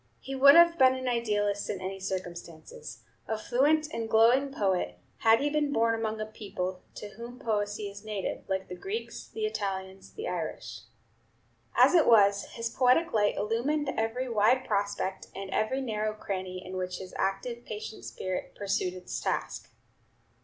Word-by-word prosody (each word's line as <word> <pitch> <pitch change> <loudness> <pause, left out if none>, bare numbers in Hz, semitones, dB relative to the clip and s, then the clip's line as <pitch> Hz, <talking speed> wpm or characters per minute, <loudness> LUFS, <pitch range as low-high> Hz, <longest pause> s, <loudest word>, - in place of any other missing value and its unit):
He 270 - -7
would 275 +1 +8
have 340 -1 +7
been 260 0 +6
an 260 0 -4
idealist 205 -4 0
in 195 - -2
any 190 +1 -5
circumstances; 170 -5 -7 0.2
a 220 - -1
fluent 290 +8 +2
and 225 -1 -3
glowing 240 +5 +4
poet, 185 - 0 0.2
had 225 +2 +5
he 290 - +1
been 300 -1 +1
born 230 -3 +2
among 220 -1 -2
a 215 - -2
people 190 -4 -5
to 210 - -7
whom 235 +4 -9
poesy 210 -3 -2
is 200 +1 -10
native, 210 -3 -4
like 190 0 -1
the - - -7
Greeks, 400 - -5
the 440 -1 -3
Italians, 190 - -4
the 445 +3 -5
Irish. - - -4 1.0
As - - +6
it 340 -3 +5
was, 200 -3 +5
his 230 0 -3
poetic 255 +8 +3
light 205 -2 +2
illumined 265 +8 0
every 225 +4 -1
wide 235 +3 +3
prospect 200 -2 -2
and 195 -1 -6
every 215 +7 0
narrow 215 -3 -2
cranny 185 -3 -5
in 185 +1 -6
which 180 -1 -3
his 185 -1 -9
active, 235 +5 -2
patient 215 +1 -7
spirit 185 -1 -5
pursued 195 -2 -1
its 180 -1 -5
task. - - -3
215 Hz, 165 wpm, -29 LUFS, 195-250 Hz, 1.0 s, would